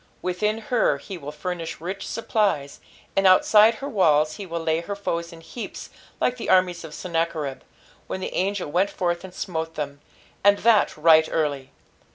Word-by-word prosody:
Within 210 +4 0 0.2
her 240 - +3
he 195 - -8
will 145 -4 -7
furnish 165 +2 -5
rich 185 +4 -5
supplies, 205 -11 -1 0.4
and 195 0 +4
outside 210 +4 +6
her 275 - -6
walls 155 - +2
he 200 - -7
wilt 170 -1 -4
lay 160 0 +2
her 200 +4 -5
foes 170 -4 -3
in 165 -1 -12
heaps 225 +8 -8 0.3
like 250 - +1
the 235 - -5
armies 180 -2 +3
of 155 -2 -9
Senuacberih, 165 -5 -2 0.5
when - - -4
the 185 - -5
angel 190 -4 -1
went 185 +5 +2
forth 175 -1 -2
and 190 - -9
smote 160 -3 -4
them. 145 -1 -5 0.4
"And 200 0 +6
that 225 -6 +3
right 160 0 +5
early." 145 -4 -1
175 Hz, 175 wpm, -24 LUFS, 160-200 Hz, 0.5 s, outside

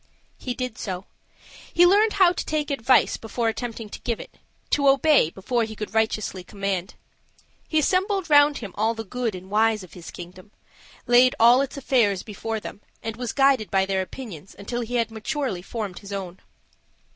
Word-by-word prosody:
He 250 -2 -4
did 250 -2 -5
so. 185 -1 -5 0.7
He 345 +1 +5
learned 415 +4 +4
how 375 -3 +5
to - - -3
take 300 -1 -2
advice 255 -1 +3
before 230 +1 -2
attempting 225 -1 -5
to - - -8
give 235 -2 -2
it, - - -12 0.3
to 280 -1 +4
obey 275 - +4
before 230 +7 -1
he 220 0 -5
could 210 +1 -6
righteously 215 -4 0
command. 195 -1 -3 0.7
He 315 - -1
assembled 375 +4 +1
round 290 -1 +5
him 210 -5 -7
all 220 +2 0
the 225 - -5
good 230 0 -3
and 185 +1 -10
wise 215 -1 +2
of 185 - -14
his 175 -2 -10
kingdom 180 +3 -11 0.6
laid 245 +1 +5
all 240 +3 +7
its 275 0 -4
affairs 230 -8 +2
before 220 +1 -4
them, 205 - -9 0.2
and 225 -1 -4
was 245 -1 -4
guided 270 -6 +3
by 190 -1 +2
their 190 -1 0
opinions 190 - -9
until 240 +4 -4
he 240 +1 -4
had 230 -2 0
maturely 220 -2 -3
formed 205 -2 -5
his 200 -1 -11
own. 190 -2 -5
225 Hz, 180 wpm, -24 LUFS, 200-265 Hz, 0.7 s, all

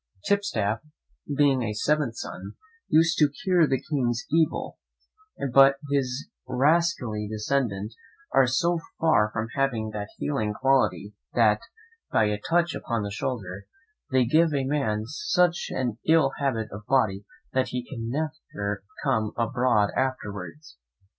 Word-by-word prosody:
Tipstaff, 115 - +1 0.6
being 140 -3 +4
a 105 -3 -2
seventh 145 0 +1
son, 95 -1 -7 0.3
used 165 +1 +3
to 150 -2 +5
cure 175 +2 +2
the 135 -2 +1
king's 120 -6 -1
evil; 160 0 0 0.7
but 135 +1 +7 0.2
his 135 -1 -1 0.2
rascally 130 -5 +1
descendants 110 -2 -1 0.4
are 135 -1 +5
so 170 +7 +1 0.2
far 155 -10 +3
from 110 +1 -3
having 120 -6 0
that 105 -1 -5
healing 110 -8 -1
quality 115 -8 +1 0.2
that, 110 -3 +4 0.5
by - - +3
a 105 0 -1
touch 170 -1 +2
upon 115 -4 -2
the 100 - -4
shoulder, 100 -4 -4 0.4
they 130 -1 +3
give 155 +4 +3
a 135 - +1
man 130 -7 0
such 180 - +1
an 120 -3 -2
ill 160 -4 +4
habit 115 -6 -1
of 105 +2 -9
body 105 -8 +2 0.3
that 130 0 +1
he 125 -1 -4
can 115 -4 -5
never 125 -9 -4 0.2
come 110 -1 0
abroad 115 -3 +2
afterwards. 130 - -4
130 Hz, 135 wpm, -26 LUFS, 105-145 Hz, 0.7 s, but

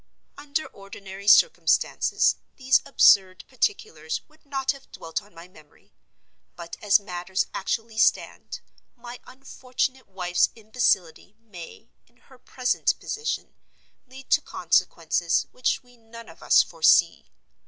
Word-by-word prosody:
Under 290 +2 -4
ordinary 195 0 -12
circumstances 475 - +3 0.2
these 260 -1 +2
absurd 190 -8 +4
particulars 430 - -3
would 310 0 -27
not 270 -1 -1
have 275 -2 -14
dwelt 165 -1 -5
on 205 - -21
my 170 +1 -13
memory. 155 -5 -22 0.6
But, 170 -1 -9
as 205 0 +4
matters 185 -1 -3
actually 225 +3 -4
stand, - - 0 0.3
my 240 0 -11
unfortunate 260 0 -5
wife's 180 -2 0
imbecility 215 -5 -1
may, 215 0 -13 0.2
in 235 - -31
her 255 +1 -21
present 250 0 -1
position, 450 +1 -5 0.5
lead 260 +1 -14
to - - +4
consequences - - 0
which - - -1
we 245 0 -23
none 230 0 -13
of - - -16
us - - +5
foresee. - - +2
230 Hz, 120 wpm, -24 LUFS, 190-265 Hz, 0.6 s, us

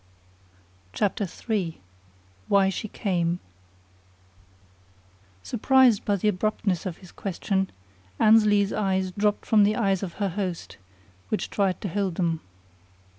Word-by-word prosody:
CHAPTER 205 -1 0 0.2
III 195 -8 -1 0.7
WHY 195 -1 +4
SHE 195 +3 -4
CAME 175 -4 -1 2.0
Surprised 250 -2 +4
by 205 - +2
the 200 +2 -1
abruptness 205 -2 0
of 175 - -5
his 185 -2 -15
question, 190 0 -2 0.5
Annesley's 210 -2 +5
eyes 190 -2 0
dropped 205 +2 0
from 215 -2 +4
the 210 +1 +3
eyes 195 -5 +1
of 185 -4 -5
her 200 -2 -1
host, 185 -2 -4 0.5
which 215 - -2
tried 195 -3 0
to - - -3
hold 195 -1 -1
them. 165 -3 0
200 Hz, 120 wpm, -25 LUFS, 185-210 Hz, 2.0 s, Annesley's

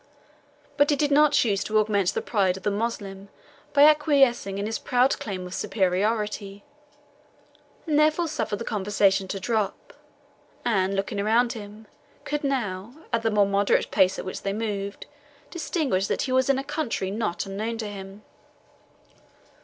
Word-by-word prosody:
But 285 0 +4
he 295 - +4
did 290 +1 0
not 300 +1 +5
choose 205 -5 +2
to 215 - 0
augment 205 -3 +1
the - - -1
pride 190 -4 +1
of - - -12
the 205 - +1
Moslem 200 -2 -4 0.4
by 285 - +5
acquiescing 280 -9 +4
in 200 - -2
his 225 +1 -3
proud 250 +2 +2
claim 185 -3 -5
of 180 - -8
superiority, 205 +1 -1 1.2
and 305 -3 +2
therefore 310 +3 +3
suffered 295 -8 -2
the 230 - -6
conversation 195 -2 +1
to 195 +1 -4
drop, 215 -1 -2 0.7
and, 195 -4 +1
looking 195 +1 -2
around 230 +4 +2
him, 210 0 -10 0.4
could 295 0 -3
now, 235 -5 -2 0.2
at 230 - +2
the 225 - +1
more 210 -2 +3
moderate 200 0 +1
pace 190 -2 +3
at - - -5
which 185 - -5
they 195 - -2
moved, 205 -2 -4 0.5
distinguish 290 - -1
that - - -1
he 260 - -3
was 260 +1 +2
in 275 - +4
a 270 - -2
country 280 -10 -3
not 205 -4 -2
unknown 215 +4 -4
to 220 -2 -4
him. 200 0 -9
210 Hz, 160 wpm, -25 LUFS, 195-255 Hz, 1.2 s, not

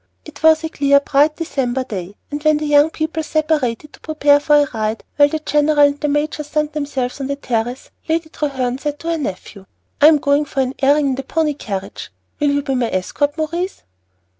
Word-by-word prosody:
It - - -12
was 320 0 +5
a 320 - -2
clear, 280 -2 +3
bright 290 +2 +2
December 265 -6 -2
day, 200 -5 -7 0.2
and 290 0 -4
when 305 0 +3
the 305 - -3
young 295 +1 +4
people 320 0 -3
separated 305 -4 -1
to - - -16
prepare 295 -2 +3
for 295 +1 +3
a - - -3
ride, 220 0 -2
while 290 0 +5
the 315 - -2
general 300 0 +1
and 285 0 +4
the 300 - 0
major 295 +1 -1
sunned 300 0 -2
themselves 280 -3 -3
on 270 - -3
the 280 - -2
terrace, 245 -2 -3 0.2
Lady 320 0 0
Treherne 265 -5 -2
said 295 0 -3
to 335 +2 -4
her 330 - 0
nephew, 195 -4 -6 0.3
"I 295 - +9
am 310 -1 +6
going 285 +1 +1
for 275 - -2
an 260 0 -1
airing 285 +1 +3
in - - 0
the 265 - -3
pony 310 +2 0
carriage. 195 -8 -6 0.3
Will 295 -1 +2
you 285 0 0
be 275 -2 -2
my 245 -3 0
escort, 285 - -1
Maurice?" 340 +4 -3
290 Hz, 215 wpm, -18 LUFS, 265-305 Hz, 0.3 s, I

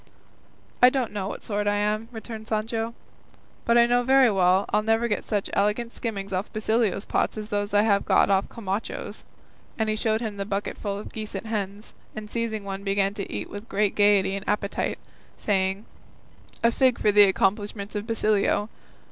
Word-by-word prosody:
'" - - -31 0.4
"I 250 - +9
don't 255 -3 -1
know 205 -2 -3
of - - -3
what - - -7
sort 205 -1 -2
I 205 - +2
am," 210 +2 -1
returned 220 -1 -8
Sancho, 225 +1 -2 0.7
"but 235 0 +4
I 235 - +7
know 245 +1 +3
very 260 -1 +5
well 190 0 +3
I'll - - +2
never 225 +2 +1
get 210 - -1
such 205 -3 -1
elegant 210 +4 0
skimmings 200 -6 -5
off 185 +3 -2
Basilio's 220 -2 0
pots - - 0
as 215 0 -6
these 205 -1 -1
I 205 +1 +4
have 200 -2 +3
got - - +3
off 195 0 +2
Camacho's;" 205 -1 -5 0.5
and 220 -1 0
he 215 - +1
showed 220 0 +1
him 220 -3 -4
the 200 - -2
bucketful 200 0 -3
of 205 - -9
geese 215 -2 -6
and 195 - -5
hens, 210 -1 -4 0.2
and 215 -1 -7
seizing 230 -3 -2
one 195 0 -5
began 195 0 +1
to 200 -1 -6
eat 105 +1 -4
with 205 +3 -9
great 205 -1 +1
gaiety 200 -2 +3
and 200 +1 -5
appetite, 205 -1 -1 0.4
saying, 195 0 0 0.8
"A 230 - +5
fig 255 -1 +3
for 210 - +2
the 205 0 +8
accomplishments 200 +1 0
of 210 +1 -4
Basilio! 215 -2 +1
210 Hz, 190 wpm, -25 LUFS, 200-225 Hz, 0.8 s, I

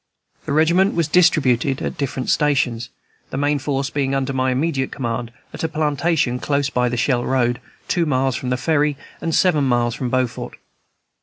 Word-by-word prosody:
The - - -3
regiment 170 +6 +3
was 170 -3 +1
distributed 140 -6 +3
at - - -3
different 135 -2 -2
stations, 130 -6 +1 0.4
the - - -5
main 145 +1 +1
force 140 -1 -2
being 135 -1 0
under 135 0 -1
my 130 0 +1
immediate 135 0 -1
command, 120 -2 -3 0.2
at - - -6
a - - +2
plantation 155 -4 0
close 140 0 0
by 125 0 +1
the 125 - -3
Shell 120 0 +1
Road, 125 -1 0 0.3
two 170 -2 +1
miles 130 -2 +1
from 125 +1 -4
the 125 - 0
ferry, 150 0 +1 0.2
and 165 -1 -1
seven 155 -7 +3
miles 120 -2 +1
from 125 +1 -3
Beaufort. 125 -1 -2
135 Hz, 175 wpm, -20 LUFS, 125-150 Hz, 0.4 s, regiment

